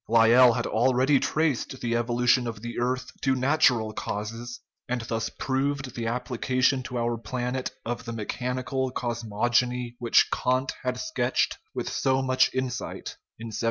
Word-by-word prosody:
Lyell 115 Hz, +2 st, +7 dB
had -, -, -1 dB
already 130 Hz, +4 st, +3 dB
traced 145 Hz, -4 st, 0 dB
the 120 Hz, -1 st, -1 dB
evolution 120 Hz, +1 st, +2 dB
of 115 Hz, -2 st, -6 dB
the 120 Hz, 0 st, -4 dB
earth 125 Hz, +1 st, -1 dB
to 135 Hz, -1 st, +2 dB
natural 130 Hz, -5 st, +3 dB
causes, 115 Hz, +4 st, -5 dB, 0.3 s
and 125 Hz, -1 st, -1 dB
thus 115 Hz, -1 st, -2 dB
proved 135 Hz, -1 st, -2 dB
the 115 Hz, -1 st, -3 dB
ap 125 Hz, +2 st, -2 dB
plication 130 Hz, +1 st, +1 dB
to 125 Hz, -1 st, -4 dB
our 120 Hz, -1 st, -1 dB
planet 125 Hz, +3 st, -3 dB, 0.2 s
of 120 Hz, +1 st, -4 dB
the 115 Hz, -, -4 dB
mechanical 125 Hz, +4 st, -2 dB
cosmogony 120 Hz, +1 st, -1 dB
which 120 Hz, -2 st, +4 dB
Kant 130 Hz, +1 st, +1 dB
had 125 Hz, 0 st, -2 dB
sketched 320 Hz, 0 st, 0 dB, 0.2 s
with -, -, -3 dB
so 130 Hz, 0 st, +1 dB
much 130 Hz, 0 st, +3 dB
insight 130 Hz, -1 st, -4 dB, 0.2 s
in 115 Hz, +1 st, -7 dB
1755. -, -, -3 dB
125 Hz, 155 wpm, -26 LUFS, 115-130 Hz, 0.3 s, Lyell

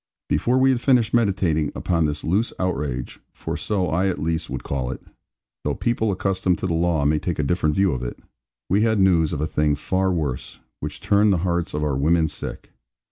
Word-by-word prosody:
Before 125 Hz, +2 st, +1 dB
we 135 Hz, +1 st, +5 dB
had 125 Hz, -2 st, 0 dB
finished 120 Hz, -5 st, +3 dB
meditating 95 Hz, -10 st, +1 dB
upon 85 Hz, -3 st, +1 dB
this 75 Hz, 0 st, -2 dB
loose 100 Hz, +8 st, 0 dB
outrage 70 Hz, -8 st, -3 dB
for -, -, -5 dB
so 100 Hz, -4 st, -1 dB
I 90 Hz, +4 st, +1 dB
at 95 Hz, -, -1 dB
least 80 Hz, +2 st, -2 dB
would -, -, -5 dB
call 65 Hz, -3 st, -2 dB
it, 65 Hz, -, -5 dB, 0.6 s
though -, -, -1 dB
people 110 Hz, -2 st, 0 dB
accustomed 95 Hz, -2 st, 0 dB
to -, -, -4 dB
the 90 Hz, -, 0 dB
law 80 Hz, -3 st, +1 dB
may 75 Hz, +1 st, +3 dB
take 85 Hz, +2 st, -3 dB
a 75 Hz, -, 0 dB
different 75 Hz, 0 st, +1 dB
view 95 Hz, -2 st, +3 dB
of 65 Hz, -3 st, -3 dB
it -, -, -5 dB, 0.5 s
we 100 Hz, +3 st, +2 dB
had 110 Hz, -1 st, +2 dB
news 85 Hz, -5 st, +4 dB
of 75 Hz, -, -3 dB
a -, -, +1 dB
thing 75 Hz, -1 st, +1 dB
far 95 Hz, +6 st, 0 dB
worse, 75 Hz, -8 st, -3 dB, 0.2 s
which -, -, -6 dB
turned 105 Hz, +1 st, +3 dB
the 95 Hz, -, +3 dB
hearts 85 Hz, -3 st, -1 dB
of 75 Hz, -, -1 dB
our 75 Hz, -3 st, 0 dB
women 80 Hz, +4 st, +2 dB
sick. -, -, -7 dB
85 Hz, 210 wpm, -23 LUFS, 75-95 Hz, 0.6 s, we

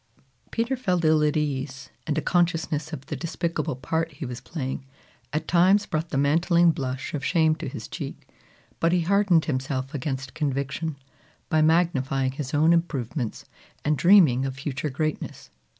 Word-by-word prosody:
Peter 235 Hz, +3 st, 0 dB
felt 180 Hz, -9 st, 0 dB
ill 155 Hz, 0 st, +4 dB
at 150 Hz, 0 st, +2 dB
ease; 135 Hz, -2 st, -3 dB, 0.2 s
and 155 Hz, -1 st, 0 dB
a 155 Hz, -, 0 dB
consciousness 165 Hz, -3 st, 0 dB
of 140 Hz, -4 st, -7 dB
the -, -, -4 dB
despicable 165 Hz, -4 st, -2 dB
part 160 Hz, +6 st, -2 dB
he 140 Hz, -, -6 dB
was 125 Hz, -1 st, -6 dB
playing, 135 Hz, -4 st, -4 dB, 0.5 s
at 155 Hz, +2 st, -2 dB
times 190 Hz, +4 st, +4 dB
brought 160 Hz, +1 st, -2 dB
the 135 Hz, -, -2 dB
mantling 170 Hz, +4 st, +4 dB
blush 135 Hz, -3 st, -4 dB
of 145 Hz, -3 st, -3 dB
shame 160 Hz, -2 st, +3 dB
to -, -, -5 dB
his -, -, -7 dB
cheek; -, -, -7 dB, 0.5 s
but 165 Hz, -, +3 dB
he 180 Hz, 0 st, +3 dB
hardened 190 Hz, -2 st, +3 dB
himself 135 Hz, -1 st, -2 dB
against 135 Hz, -2 st, -4 dB
conviction, 140 Hz, +2 st, -2 dB, 0.5 s
by 155 Hz, -, +3 dB
magnifying 135 Hz, -5 st, +2 dB
his 135 Hz, -1 st, -5 dB
own 155 Hz, +3 st, +4 dB
improvements 135 Hz, -7 st, -2 dB, 0.4 s
and 150 Hz, +1 st, +3 dB
dreaming 155 Hz, -5 st, +6 dB
of 135 Hz, -1 st, -3 dB
future 140 Hz, +2 st, -3 dB
greatness. 155 Hz, +3 st, -4 dB
155 Hz, 160 wpm, -25 LUFS, 135-165 Hz, 0.5 s, dreaming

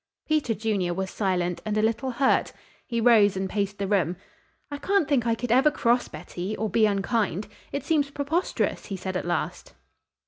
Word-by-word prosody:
Peter 300 Hz, -7 st, +1 dB
Junior 200 Hz, -5 st, -1 dB
was 190 Hz, 0 st, -3 dB
silent 180 Hz, -3 st, -1 dB
and 215 Hz, 0 st, -2 dB
a -, -, +3 dB
little 230 Hz, +4 st, 0 dB
hurt. 260 Hz, +2 st, +2 dB, 0.3 s
He 235 Hz, -1 st, -1 dB
rose 220 Hz, -4 st, +5 dB
and 190 Hz, 0 st, -1 dB
paced 200 Hz, 0 st, -2 dB
the 200 Hz, -, -2 dB
room. 185 Hz, -4 st, +1 dB, 0.5 s
"I 285 Hz, -, -3 dB
can't 395 Hz, -4 st, +1 dB
think 255 Hz, -5 st, +1 dB
I 230 Hz, -, +2 dB
could 240 Hz, 0 st, -4 dB
ever 265 Hz, +5 st, +5 dB
cross 245 Hz, -4 st, +1 dB
Betty, 175 Hz, +6 st, -6 dB
or 215 Hz, -2 st, -2 dB
be 220 Hz, +2 st, +4 dB
unkind. 205 Hz, -1 st, 0 dB, 0.2 s
It 280 Hz, -1 st, -4 dB
seems 295 Hz, -4 st, +2 dB
preposterous," 290 Hz, +6 st, -1 dB
he 195 Hz, -, -4 dB
said 185 Hz, 0 st, -5 dB
at 180 Hz, -, -2 dB
last. 175 Hz, -2 st, -3 dB
215 Hz, 185 wpm, -26 LUFS, 190-255 Hz, 0.5 s, rose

